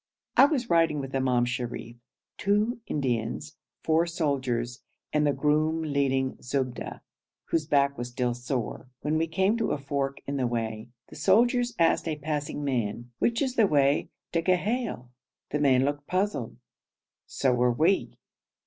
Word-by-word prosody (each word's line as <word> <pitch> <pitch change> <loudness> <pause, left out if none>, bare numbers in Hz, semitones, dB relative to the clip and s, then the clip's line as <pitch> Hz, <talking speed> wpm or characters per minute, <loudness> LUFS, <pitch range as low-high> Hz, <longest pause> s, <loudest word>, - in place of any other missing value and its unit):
I - - +8
was 275 -5 0
riding 165 -5 +3
with 135 -1 -6
Imam 125 -2 +2
Sharif, 120 -1 -4 0.4
two 210 +5 +1
Indians, 130 +1 -2 0.3
four 165 +2 +3
soldiers, 130 -7 -1 0.3
and 150 -1 +3
the - - +4
groom 155 +3 +1
leading 135 -3 0
Zubda, 130 -1 -3 0.5
whose 155 -2 0
back 140 -2 +2
was 120 0 -3
still 125 0 -1
sore, 125 0 -4
when 150 +2 0
we 165 - +1
came 190 +6 +1
to 225 - 0
a - - -1
fork 140 0 -2
in 140 0 -3
the 130 -2 +1
way. 115 -1 -3 0.2
The - - -12
soldiers 240 - +3
asked 165 0 +3
a 155 - -1
passing 150 -1 -3
man, 120 -3 -2
'Which 235 +3 +2
is 260 -2 -1
the 225 -5 +5
way 140 -3 +2 0.2
to 165 - +1
Ghail?' 185 - 0 0.4
The 150 - 0
man 135 -2 +4
looked 145 0 -2
puzzled; 185 - -1 0.7
so 130 -2 +1
were 125 0 +3
we. 165 +11 +1
145 Hz, 155 wpm, -27 LUFS, 125-165 Hz, 0.7 s, I